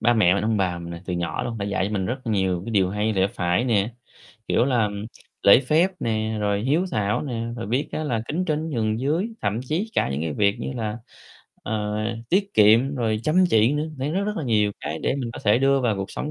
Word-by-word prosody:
ba 120 - +4
mẹ 95 -5 +4
mình, 100 - -1
ông 110 0 +1
bà 90 -3 0
mình 85 0 -7
là 85 - -7
từ 90 - -3
nhỏ 85 -1 -2
luôn 115 -1 -4
đã 100 - -2
dạy 100 -1 -1
cho 105 - -4
mình 95 -3 -1
rất 130 +3 -4
nhiều 95 -5 0
cái 115 - -5
điều 95 -4 +2
hay 105 +2 0
lẽ 95 -2 +2
phải 90 +3 0
nè, 115 -2 +1 0.5
kiểu 120 - +2
là, 125 -5 +2
ừm, 105 0 -5 0.4
lễ 100 - +8
phép 155 +8 +2
nè, 110 -1 -1
rồi 105 -1 0
hiếu 155 +8 +2
thảo 105 -6 0
nè, 115 -5 -3
rồi 115 - -4
biết 125 +8 -1
á 155 - -3
là 120 -7 -1
kính 175 +5 -1
trên 155 0 -1
nhường 110 -5 -1
dưới, 160 - 0
thậm 105 +2 -1
chí 165 - -2
cả - - +2
những 70 - -2
cái 80 -2 -2
việc 100 +4 +2
như - - -4
là, 110 -3 -3 0.7
ờ, 105 -1 -2 0.3
tiết 195 +4 +1
kiệm 115 +7 +5
rồi 110 -4 -1
chăm 170 +8 +3
chỉ 110 +1 +4
nữa. 150 +1 -1
Đấy, 135 +2 -2
rất, 195 +3 0
rất 210 +1 -3
là 160 - -3
nhiều 105 -4 +2
cái 75 +2 -4
để - - +1
mình 125 -4 -3
có - - -8
thể 105 +2 +4
đưa 135 +1 +3
vào 115 -5 +1
cuộc 95 0 -4
sống 150 - -4
110 Hz, 255 wpm, -24 LUFS, 100-135 Hz, 0.7 s, lễ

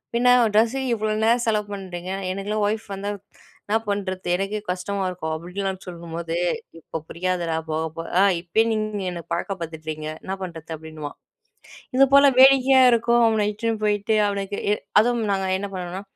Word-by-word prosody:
பின்ன 245 +1 +5 0.2
ட்ரெஸ்ஸுக்கு 250 +3 +2
இவ்வளோ 215 0 -1
நேரம் 235 +2 +3
செலவு 210 -1 +1
பண்ணுறீங்க. 185 -2 -6 0.2
எனக்கெல்லாம் 205 +2 -1
ஒய்ஃப் 220 +1 -3
வந்தா 200 +1 -3 0.6
என்ன 215 - +2
பண்ணுறது 190 -3 -3
எனக்கே 195 +3 -2
கஷ்டமா 195 +2 -3
இருக்கும்." 160 -3 -4
அப்படின்லாம் 190 +3 -4
சொல்லும்போது. 170 -1 -5 0.4
"இப்போ 165 - -6
புரியாதுடா 175 -1 -1 0.2
போக 160 +1 -1
போக 165 - -5
ஆ - - +6 0.2
இப்பயே 180 +6 +2
நீங்க 215 -1 -2
என்ன 170 -1 -6
பழக்க 175 +3 -2
படுத்துட்றீங்க 155 -1 -5 0.2
என்ன 190 - -4
பண்றது?" 165 -2 -8
அப்படின்னுவான். 155 -2 -8 0.8
இதுபோல 275 +1 +7
வேடிக்கையா 265 0 +7
இருக்கும் 235 +1 +3
அவன 220 -2 +2
இட்டுன்னு 220 0 -2
போய்ட்டு 210 +1 +1
அவனுக்கு 200 0 -3 0.4
அதுவும் 235 0 +1
நாங்க 195 -1 0
என்ன 200 0 -4
பண்ணுவோம்னா, 180 +1 -5
200 Hz, 150 wpm, -23 LUFS, 175-220 Hz, 0.8 s, இதுபோல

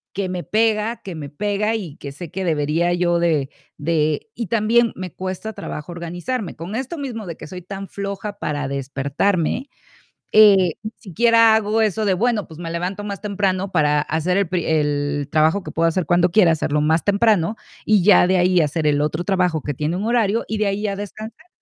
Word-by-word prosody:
que 195 -1 -2
me 180 -1 -4
pega 220 +1 0
que 185 -3 -7
me 145 -3 -7
pega 205 +7 -1
y 180 -10 -5
que 140 - -7
sé 165 +4 -8
que 190 +1 -3
debería 160 +2 +1
yo 175 -1 +1
de 155 -5 +1 0.3
de 155 +3 0
y 230 - -3
también 230 +3 +2
me 185 -2 -6
cuesta 190 +4 -5
trabajo 150 -4 -7
organizarme. 175 +6 -4
Con 170 +6 -6
esto 265 +7 -4
mismo 245 -7 -5
de 170 -3 -6
que - - -10
soy 180 +3 -8
tan 195 +2 -7
floja 200 +1 -5
para 145 -6 -3
despertarme, 140 - -1 0.6
eh, 195 -5 +6
ni 215 - -5
siquiera 230 +3 +4
hago 220 +1 +1
eso 220 0 +1
de: 195 - +3
"Bueno, 215 -1 0
pues, 160 0 -12
me 170 -1 -5
levanto 180 +5 -3
más 200 -1 -5
temprano 195 -2 -1
para 150 -4 +2
hacer 160 +4 -1
el 200 -4 +1
pri 180 -2 -1
el 145 -2 0
trabajo 160 +5 +2
que - - -7
puedo 165 +1 +1
hacer 165 +1 0
cuando 175 0 +3
quiera, 180 -3 +5
hacerlo 150 -2 0
más 160 +2 +1
temprano 205 -2 +2 0.3
y 210 -4 +4
ya 195 -2 +6
de 190 - +2
ahí 180 0 +3
hacer 155 0 0
el 145 -1 +2
otro 155 +3 -1
trabajo 180 -4 +1
que 145 - -3
tiene 150 +5 -2
un 190 - -3
horario 230 -2 +1
y 220 - -1
de 210 - +1
ahí 200 +1 -1
ya 200 -2 -2
descansar". 215 - -8
185 Hz, 205 wpm, -21 LUFS, 160-210 Hz, 0.6 s, eh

